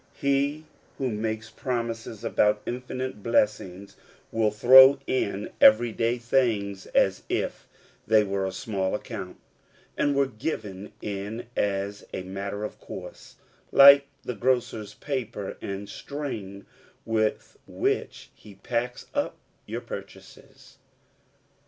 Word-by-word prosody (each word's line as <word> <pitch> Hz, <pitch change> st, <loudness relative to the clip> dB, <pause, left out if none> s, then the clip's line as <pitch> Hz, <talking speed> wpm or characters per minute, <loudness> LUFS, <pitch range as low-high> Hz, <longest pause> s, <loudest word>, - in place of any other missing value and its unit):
He 140 Hz, +2 st, 0 dB, 0.3 s
who 130 Hz, -3 st, -1 dB
makes 110 Hz, +1 st, -3 dB
promises 115 Hz, -4 st, -4 dB
about 105 Hz, 0 st, +2 dB
infinite 125 Hz, -1 st, -5 dB
blessings 100 Hz, -4 st, 0 dB, 0.4 s
will 110 Hz, -1 st, +2 dB
throw 130 Hz, +6 st, +8 dB
in 105 Hz, -5 st, -2 dB
every 270 Hz, -, +7 dB
day 115 Hz, +2 st, 0 dB
things 115 Hz, -5 st, 0 dB
as -, -, +2 dB
if -, -, -2 dB, 0.4 s
they 110 Hz, -1 st, +5 dB
were 100 Hz, -1 st, -2 dB
of 95 Hz, -1 st, -4 dB
small 95 Hz, -3 st, -2 dB
account, 100 Hz, -4 st, -7 dB, 0.6 s
and 145 Hz, -1 st, +1 dB
were 140 Hz, 0 st, +3 dB
given 110 Hz, -7 st, -5 dB
in 105 Hz, +4 st, -4 dB
as 100 Hz, 0 st, -1 dB
a 95 Hz, -, -4 dB
matter 100 Hz, +2 st, -5 dB
of 105 Hz, -, -6 dB
course, -, -, -10 dB, 0.4 s
like 140 Hz, 0 st, +9 dB, 0.2 s
the 125 Hz, -, -3 dB
grocer's 115 Hz, -3 st, -1 dB
paper 120 Hz, -8 st, -4 dB
and 100 Hz, +1 st, -5 dB
string 105 Hz, -6 st, -6 dB, 0.4 s
with 110 Hz, -1 st, -1 dB
which -, -, -2 dB
he 105 Hz, -2 st, -15 dB
packs 120 Hz, +4 st, -3 dB
up 285 Hz, 0 st, -1 dB, 0.3 s
our -, -, -3 dB
purchases. -, -, -11 dB
110 Hz, 115 wpm, -26 LUFS, 100-130 Hz, 0.6 s, like